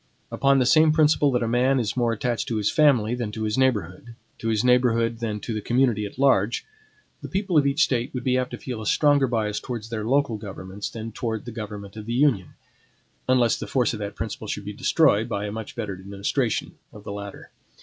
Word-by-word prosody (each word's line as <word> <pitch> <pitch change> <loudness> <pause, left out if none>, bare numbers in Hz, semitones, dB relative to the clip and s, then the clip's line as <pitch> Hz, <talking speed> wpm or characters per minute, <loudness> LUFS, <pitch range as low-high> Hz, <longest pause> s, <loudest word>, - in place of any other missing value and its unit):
Upon 135 0 +3
the 130 - +3
same 155 +4 +5
principle 150 -2 +4
that 125 -2 +1
a - - -1
man 125 +3 +2
is 110 -4 -2
more 120 -2 +1
attached 115 +1 -2
to 115 - -2
his 105 -1 +1
family 130 -8 +3
than 120 -4 -3
to 110 - -4
his 105 0 -1
neighborhood, 115 -4 -1 0.2
to 115 - -4
his 110 -2 +1
neighborhood 120 -2 +2
than 110 -3 -3
to 115 - -4
the 110 - -3
community 120 -3 +1
at 100 - -14
large, 125 -5 +2 0.6
the - - -6
people 195 -2 -1
of 145 -2 +5
each 140 +5 +3
State 125 -6 0
would 125 - -3
be 125 0 +1
apt 130 0 0
to - - -6
feel 125 -4 -6
a 105 - -5
stronger 145 0 +3
bias 110 -3 -1
towards 115 -3 -6
their 110 -2 -3
local 130 -1 +1
governments 100 -1 -7
than 115 0 -7
towards 110 0 -4
the 120 - -6
government 105 -3 -7
of 105 0 -8
the 115 - -2
Union; 120 - +1 0.7
unless 125 -3 +3
the - - -6
force 125 -3 +1
of 110 - -5
that 100 -1 -5
principle 110 0 -5
should 100 0 -4
be 105 - -5
destroyed 120 -2 +2
by 100 -2 -2
a 105 - -4
much 110 +5 -7
better 110 -5 -4
administration 100 +6 -2
of 105 - -13
the - - -6
latter. 100 -1 -8
115 Hz, 225 wpm, -24 LUFS, 105-130 Hz, 0.7 s, same